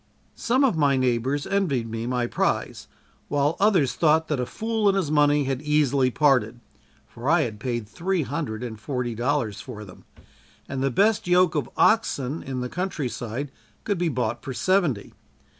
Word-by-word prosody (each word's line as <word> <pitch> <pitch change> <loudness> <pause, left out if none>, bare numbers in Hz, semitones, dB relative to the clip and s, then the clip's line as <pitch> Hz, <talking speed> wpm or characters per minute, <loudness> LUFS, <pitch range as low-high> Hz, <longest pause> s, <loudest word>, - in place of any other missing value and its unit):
Some 255 +3 +1
of 255 -9 +3
my 140 -3 +3
neighbors 130 +3 0
envied 150 -13 0
me 115 +1 -4
my 125 -1 0
prize - - -2 0.4
while 145 +2 +1
others 190 -10 +3
thought 160 0 +2
that 150 -4 0
a 125 - -2
fool 220 - -1
and 195 - +2
his 165 -6 -1
money 145 -1 +4
had 135 -1 -2
easily 145 -3 +2
parted, 125 -4 +2 0.5
for 120 +4 -5
I 170 0 +4
had 110 -7 -3
paid 120 -2 -3
three 170 - -1
hundred 130 -6 -4
and 110 -3 -6
forty 125 0 -3
dollars 120 -3 -1
for 105 0 -9
them, 90 - -15 0.6
and 135 -1 -4
the 135 - +2
best 205 - +2
yoke 180 -2 +4
of 145 -6 -2
oxen 155 - +2
in 130 -1 -4
the 125 - -2
country 170 -4 -3
side 125 +5 -5 0.3
could 200 -4 -1
be 175 -1 +1
bought 120 -4 -2
for 130 -3 -5
seventy. 175 - 0
140 Hz, 175 wpm, -24 LUFS, 120-165 Hz, 0.6 s, money